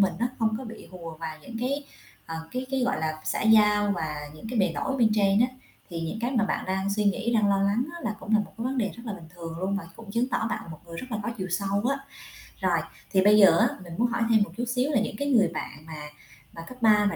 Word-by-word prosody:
mình 190 -3 +4
á, 240 - +1
không 220 -1 +2
có 260 - -6
bị 225 -1 -9
hùa 165 -3 -8
vào 160 -1 -6
những 230 - -8
cái, 255 +2 0 0.6
ờ, 165 - -4
cái 255 +1 -3
cái, 270 -1 +1
gọi 255 +1 +1
là, 155 -1 -2
xã - - -1
giao 210 -2 +5
và 155 -3 -3 0.2
những 220 +8 -9
cái 245 - -2
bề 195 - +4
nổi 270 0 -1
bên 225 -4 +4
trên 200 0 +4
á. 245 - +6 0.4
Thì 170 - -4
những, 165 +7 -3
cái, 240 +2 0
mà 230 -5 +2
bạn - - -1
đang 190 +1 0
suy 210 0 +1
nghĩ, 225 +4 +1
đang 210 -2 +4
lo 195 - +3
lắng 205 +5 +2
á 340 - -7
là 215 - -1
cũng 220 - -4
là - - +6
một 195 -2 -3
cái 230 - -3
vấn 260 +1 -1
đề 200 -4 +1
rất 235 - -10
là 215 - -2
bình 165 -5 -9
thường 165 -1 -7
luôn 195 +2 0
và 200 - -4
cũng 220 -3 -10
chứng 240 +4 +1
tỏ 225 - 0
bạn 170 - -4
một 155 - -8
người 170 0 -8
rất 255 - -5
là 215 - -1
có 230 - -2
chiều 185 -1 -3
sâu 200 +3 0
á. 275 - 0 0.6
Rồi, - - +3 0.3
thì 190 -1 +4
bây 210 +1 +7
giờ 190 -5 +8
á - - +6 0.2
mình 175 -2 -9
muốn 240 +2 +3
hỏi 235 0 -2
thêm 220 -2 +5
một - - -6
chút 245 - -1
xíu 250 +4 +1
là 255 - +3
những 220 - -2
cái 285 0 -1
người 225 -6 +5
bạn 155 - -6
mà 160 -1 -8 0.6
mà 165 - -8
cấp 255 +10 -10
3 210 -2 +6
và - - -4
210 Hz, 290 wpm, -27 LUFS, 185-235 Hz, 0.6 s, giờ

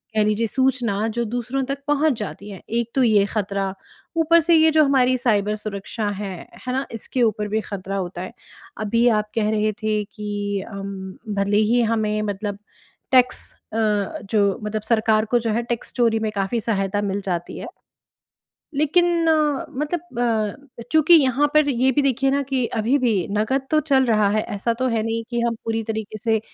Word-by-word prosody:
कह 215 - +4
लीजिए 215 +2 +1
सूचना 240 -5 0
जो 235 +2 -2
दूसरों 245 +4 -2
तक 275 +1 -4
पहुँच 295 +1 +3
जाती 210 0 -6
है 195 - -9
एक 235 0 -1
तो 265 - +4
ये 210 -4 +4
ख़तरा। 200 -2 -2 0.4
ऊपर 330 +1 +5
से 335 +1 +4
ये 320 0 +6
जो 310 0 +5
हमारी 255 -2 +3
साइबर 210 -4 +1
सुरक्षा 210 0 -4
है। 200 -1 -4 0.4
है 250 - -1
ना? 265 +1 -1
इसके 230 +3 -3
ऊपर 210 -1 +1
भी 215 +1 -1
ख़तरा 195 -1 -5
होता 180 -1 -4
है। 185 - -7 0.5
अभी 230 +3 +2
आप 210 0 -5
कह 215 -2 +1
रहे 215 0 +1
थे 215 -1 +1
कि 205 -1 -4
अ, 225 - -10
भले 200 +1 -3
ही 245 - +4
हमें 215 -1 0
मतलब 205 0 -3 0.5
टैक्स 255 -1 +3 0.2
अ, - - -2 0.5
जो 205 0 +2
मतलब 210 0 -2
सरकार 220 0 +2
को 240 - +4
जो 230 -1 -2
है 235 - +1
टैक्स 235 0 -4
चोरी 230 -3 +2
में 220 -1 -1
काफ़ी 195 +4 0
सहायता 205 -2 -1
मिल 200 0 -2
जाती 175 -3 -3
है। - - -7 1.1
लेकिन 335 +3 +2
अ, 305 -3 +2
मतलब 300 +2 -4 0.6
अ, - - -6
चूँकि 315 +1 +5
यहाँ 285 -2 +4
पर 305 -1 +5
ये 260 0 +2
भी 290 - +2
देखिए 270 0 +2
ना 280 +1 +1
कि 265 -2 -1
अभी 235 +6 +2
भी 240 -5 +2 0.2
नगद 260 +6 0
तो 310 - +4
चल 275 -3 +3
रहा 215 -3 +3
है 215 +1 +2
ऐसा 220 +4 0
तो 255 +2 -1
है 230 -2 0
नहीं 225 +1 -2
कि 240 -1 -1
हम 235 0 0
पूरी 225 0 -1
तरीके 220 -1 -4
से 225 -1 +1
225 Hz, 190 wpm, -22 LUFS, 210-260 Hz, 1.1 s, ये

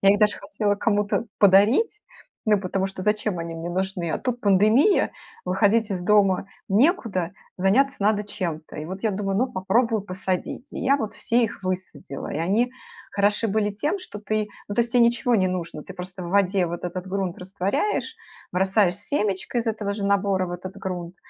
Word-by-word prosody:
Я 195 0 +6
их - - 0
даже 210 0 +3
хотела 205 0 -1
кому-то 210 +2 0
подарить, 215 - +5 0.5
ну 210 -2 +4
потому 190 0 -1
что 190 -1 -7
зачем 210 -2 0
они 165 0 -5
мне 165 +1 -5
нужны, 185 -1 -2
а - - -1
тут 245 -1 -2
пандемия, 215 - +4 0.3
выходить 205 +4 +2
из 185 - -2
дома 195 -1 +3 0.2
некуда, 205 - +2 0.3
заняться 265 +10 +3
надо 210 +1 +2
чем-то. 180 -7 -5
И 150 - -5
вот 190 +4 -7
я 220 - +2
думаю: 195 0 -2
ну, 255 +2 +1
попробую 220 +3 +1
посадить. 190 +7 -4
И - - -5
я 275 +2 +3
вот 220 -5 -4
все 235 +1 +1
их 210 - -5
высадила. 180 -7 -5
И - - -3
они 210 +9 +1 0.4
хороши 205 +2 +1
были 210 0 +1
тем, 300 - -1
что 210 - -9
ты 215 0 -1 0.2
ну, 205 - -3
то - - +5
есть 235 - -7
тебе 245 - +5
ничего 235 +1 +3
не 185 -3 +3
нужно, 170 -4 -4
ты 185 - -10
просто 185 0 -7
в 175 - -5
воде 190 -1 +2
вот 175 +1 -5
этот 180 +1 -4
грунт 190 -2 -2
растворяешь, 195 - -1 0.4
бросаешь 190 0 +3
семечко 210 -1 -1
из 235 - -2
этого 215 -2 -1
же 200 -1 -4
набора 195 -2 +2
в 175 - -6
этот 185 +2 -7
грунт 180 -2 -5
200 Hz, 190 wpm, -24 LUFS, 185-220 Hz, 0.5 s, Я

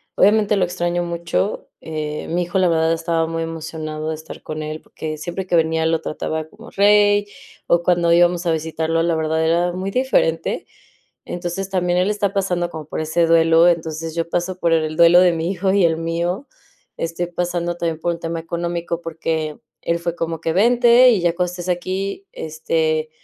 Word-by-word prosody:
obviamente 210 +1 +4
lo 185 - +3
extraño 175 0 -1
mucho. 170 +3 -2
Eh, 155 -1 -5
mi 175 +2 0
hijo, 175 +2 -2
la 185 - +4
verdad, 160 0 +2
estaba 165 0 0
muy 165 0 -3
emocionado 155 -1 -5
de 160 - -2
estar 160 +1 -11
con 155 0 -5
él, 155 +1 -5
porque 155 -1 -6
siempre 175 +4 -5
que 175 - +1
venía 160 0 +2
lo 160 0 +1
trataba 155 0 -3
como 225 +3 -14
rey, 205 0 +4 0.4
o 170 0 +3
cuando 170 -1 +2
íbamos 175 +1 +3
a 170 - +2
visitarlo, 160 +1 -1
la 170 -1 +1
verdad, 160 0 0
era 170 +2 +2
muy 190 +2 -3
diferente. 195 -10 0 0.6
Entonces, 175 +2 -4
también 180 -1 +1
él 185 - +2
está 205 -2 0
pasando 180 -3 -1
como 160 -2 -7
por - - -4
ese 160 +2 +1
duelo, 165 0 +5
entonces, 160 -1 -2
yo 170 0 -2
paso 175 +2 -2
por 170 - +2
el 155 -1 +1
duelo 170 +1 +7
de 180 -1 +5
mi 165 +1 -2
hijo 190 0 0
y 195 -2 +3
el 165 -1 +3
mío. 170 - -2 0.5
Estoy 165 +1 -3
pasando 175 0 -2
también 165 -2 -2
por 170 +1 0
un 165 - -10
tema 165 0 -3
económico, 170 0 -3
porque 160 -2 -3 0.2
él 170 0 0
fue 170 0 -3
como 165 -1 -3
que: 165 - -1
"Vente, 240 +5 +6
y 220 -6 +2
ya 170 -1 +2
cuando 180 0 -1
estés 180 0 -7
aquí, 190 - -3
este, 155 0 -1
170 Hz, 190 wpm, -20 LUFS, 160-180 Hz, 0.6 s, duelo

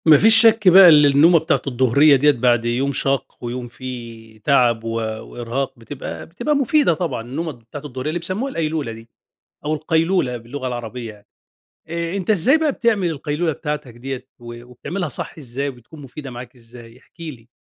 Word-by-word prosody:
ما 155 -2 +8
فيش 225 +7 +5
شك 225 -3 +4
بقى 185 0 +9
اللي 150 -2 +7
النومة 160 +5 +5
بتاعة 160 +1 0
الضهرية 135 +3 +4
ديّة 145 +3 +4
بعد 120 -2 +1
يوم 125 +4 0
شاق، 135 0 -2
ويوم 120 0 -5
فيه 115 -3 -10
تعب 120 -3 +2
و 115 - -4
وإرهاق، 115 +4 -4
بتبقى 130 +4 -8
بتبقى 295 - -2
مفيدة 280 - +2
طبعًا، 160 -7 -3
النومة 145 +8 -5
بتاعة 125 +3 -11
الضهرية 130 +1 -5
اللي 170 +3 -2
بيسمُّوها 190 +11 -3
القيلولة 155 - -2
دي، 115 0 -12 0.6
أو 150 - 0
القيلولة 160 -3 0
باللغة 130 +3 -7
العربية 120 -2 -6
يعني، 105 0 -21 0.6
آآ 170 +2 -3
أنت 195 +1 -3
إزاي 215 - +5
بقى 310 -2 +1
بتعمل 215 -8 0
القيلولة 155 +2 -2
بتاعتك 150 -5 -5
ديّة، 130 +1 -7
و 120 -1 -10
وبتعملها 170 +10 -5
صح - - -4
إزاي؟ 135 0 -4
وبتكون 135 +4 -12
مفيدة 135 +1 -9
معاك 120 0 -10
إزاي؟ 115 -1 -15
احكِ - - -26
لي. 135 -9 -9
140 Hz, 175 wpm, -20 LUFS, 120-165 Hz, 0.6 s, بقى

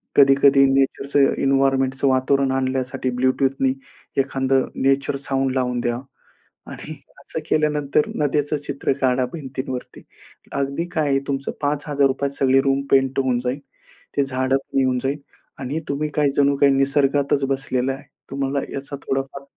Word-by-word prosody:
कधी-कधी 135 0 +6
नेचरचं 135 +1 +2
एन्व्हायर्नमेंटचं 135 0 +2
वातावरण 135 +1 +2
आणण्यासाठी 130 0 -1
ब्लूटूथनी 130 +1 +1 0.5
एखादं 135 -1 +1 0.2
नेचर 135 +1 +2
साउंड 135 -1 -1
लावून 125 -1 0
द्या. 120 0 -1 0.7
आणि - - -8 0.3
असं - - -5
केल्यानंतर 150 -1 +1
नद्याचं 145 0 0
चित्र 140 -1 -2
काढा 130 -1 +2
भिंतींवरती. 130 -4 -6 0.5
अगदी 140 +4 -1
काय 155 -3 +1
आहे? 135 0 +2
तुमचं 135 -1 -2
₹5000त 140 -1 0
सगळी 135 -1 +3
रूम 135 0 +1
पेंट 135 0 +3
होऊन 130 -2 +1
जाईन. 125 +3 -2 0.6
ते 140 - +3
झाडं 130 0 0
पण 135 0 -3
येऊन 130 -1 +1
जाईल 140 +2 -1 0.4
आणि 140 +4 -3
तुम्ही 145 +2 -1
काही 145 -2 +3
जणू 140 0 +4
काही 140 - +6
निसर्गातच 140 0 +2
बसलेला 135 -1 -1
आहे. 135 - -10 0.3
तुम्हाला 140 0 -1
याचा 140 +1 -5
थोडाफार 135 +1 -3
135 Hz, 135 wpm, -21 LUFS, 130-140 Hz, 0.7 s, कधी-कधी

